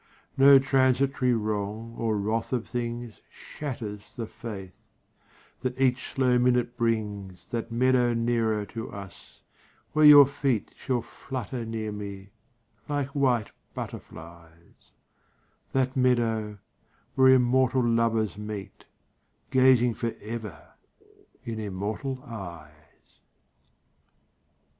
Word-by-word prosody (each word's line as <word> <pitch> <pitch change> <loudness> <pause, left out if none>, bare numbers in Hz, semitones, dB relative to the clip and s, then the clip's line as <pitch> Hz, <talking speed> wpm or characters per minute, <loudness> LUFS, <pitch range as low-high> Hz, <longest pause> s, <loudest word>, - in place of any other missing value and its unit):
No 135 +1 +8
transitory 130 -1 +2
wrong 110 +1 -3
or 110 -2 -1
wrath 110 +4 -2
of 120 -2 -1
things 120 -2 -5
Shatters 110 -8 -7
the 120 -3 -4
faith 100 -5 -8 0.9
that 130 0 -4
each 130 -1 +1
slow 125 -2 +2
minute 125 -1 +2
brings 105 -6 -3
That 115 -1 -3
meadow 125 0 +3
nearer 115 -3 0
to 115 +2 -7
us 100 -3 -11 0.5
where 155 - +2
your 145 -1 +10
feet 135 -5 -1
Shall 125 -3 -2
flutter 120 +1 -6
near 110 -1 -4
me 100 -1 -7 0.6
like 145 -2 -1
white 130 -6 +1 0.2
butterfilies 85 0 -10 0.8
That 130 -1 0
meadow 115 -5 +1 0.6
where 130 0 +5
immortal 130 0 +3
lovers 115 -3 +1
meet, 105 -2 -7 0.7
Gazing 130 -2 +5
forever 110 -2 -6 0.7
in 115 -1 -4
immortal 110 +7 -4
eyes. 85 - -11
115 Hz, 100 wpm, -27 LUFS, 105-130 Hz, 0.9 s, your